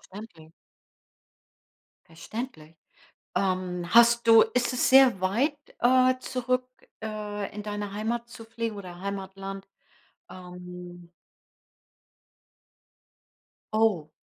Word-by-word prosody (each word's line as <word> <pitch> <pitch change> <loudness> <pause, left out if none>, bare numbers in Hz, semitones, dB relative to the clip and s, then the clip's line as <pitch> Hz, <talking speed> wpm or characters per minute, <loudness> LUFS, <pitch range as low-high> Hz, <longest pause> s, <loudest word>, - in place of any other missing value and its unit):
Okay. 170 -7 -11 1.5
Verständlich. 165 -1 -8 0.6
Ähm. 185 -2 -1
Hast 235 0 +6
du 225 -1 +9
ist 250 0 +1
es 250 - +2
sehr 260 -6 +6
weit, 245 +11 +1 0.2
äh, 255 +1 +4
zurück, 255 0 -2 0.3
äh, 210 -2 -5
in 210 - -6
deine 205 -1 -5
Heimat 235 +3 -3
zu 230 -1 -11
fliegen 230 -1 -4
oder 180 -3 -9
Heimatland? 195 0 -6 0.6
Ähm. 180 -1 -11 2.6
Oh. 210 -9 +2
210 Hz, 90 wpm, -27 LUFS, 185-235 Hz, 2.6 s, du